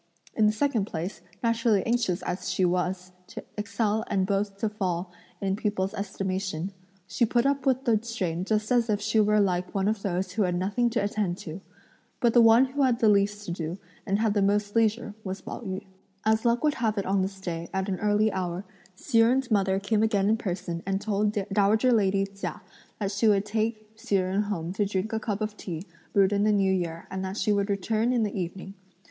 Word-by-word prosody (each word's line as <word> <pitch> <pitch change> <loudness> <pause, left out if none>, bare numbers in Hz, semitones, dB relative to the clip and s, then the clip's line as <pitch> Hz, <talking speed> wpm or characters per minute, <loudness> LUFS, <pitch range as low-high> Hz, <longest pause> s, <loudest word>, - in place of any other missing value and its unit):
In 215 - +3
the - - +4
second 225 -2 0
place, 175 0 -5 0.2
naturally 230 -3 +2
anxious 230 -7 0
as 180 +1 -3
she 185 - +2
was 180 +1 -1 0.2
to - - -8
excel 210 +1 -1
and 195 -2 +1
both 195 0 -1
to 220 - 0
fall 185 -4 -2 0.3
in 195 -1 0
people's 200 -2 -1
estimation, 190 -3 -3 0.3
she 235 - -1
put 240 +2 +2
up 275 -1 +1
with 260 0 +2
the 225 -4 +3
strain 185 -7 -2
just 215 +2 -1
as 240 -2 +3
if 205 -1 +2
she 220 +1 +1
were 210 0 +4
like 180 -2 0
one 195 0 +1
of 215 -1 0
those 185 -1 -2
who 215 +4 -1
had 180 -3 +1
nothing 205 +7 +1
to 230 -3 0
attend 200 -3 -1
to. 165 +2 -8 0.6
But 235 -2 +3
the 240 - +7
one 230 +3 +7
who 275 +2 -3
had 255 -3 +3
the 225 -3 +4
least 205 0 +2
to - - -4
do 170 0 -4 0.3
and 200 -2 0
had 215 -1 +1
the 205 - +2
most 205 +1 +1
leisure 225 -1 +1
was 190 0 -4
Pao - - -7
yü. 195 -2 -5 0.4
As 220 +1 +2
luck 235 +2 +2
would 300 -1 +3
have 220 -2 +1
it 200 - -1
on 195 0 +1
this 190 +1 -3
day, 170 -3 -5
at 190 0 -1
an 190 -2 -2
early 210 +1 +2
hour, 185 0 -3 0.3
Hsi 225 +4 +1
Jen's 245 +2 +3
mother 195 -2 +2
came 210 +2 +1
again 205 -3 +2
in 220 - +3
person 180 -5 -4
and 195 0 -1
told 210 0 0 0.2
dowager 215 +5 +3
lady 195 -3 +2
Chia 195 0 -6 0.3
that 200 -2 -2
she 205 +3 +1
would 205 -1 +3
take 215 0 -2
Hsi 205 - -1
Jen 185 +2 +1
home 185 -5 -3
to 205 - +1
drink 200 +2 -2
a 220 - 0
cup 215 -2 -3
of 215 0 -2
tea 170 -5 -6 0.3
brewed 195 0 +4
in 200 0 +2
the 215 - +4
new 195 -2 +3
year 170 -3 -3
and 190 0 -3
that 190 +2 -4
she 210 +1 +1
would 200 0 0
return 215 +4 +1
in 240 -3 +2
the 210 - -2
evening. 190 +1 -5
205 Hz, 220 wpm, -27 LUFS, 190-220 Hz, 0.6 s, the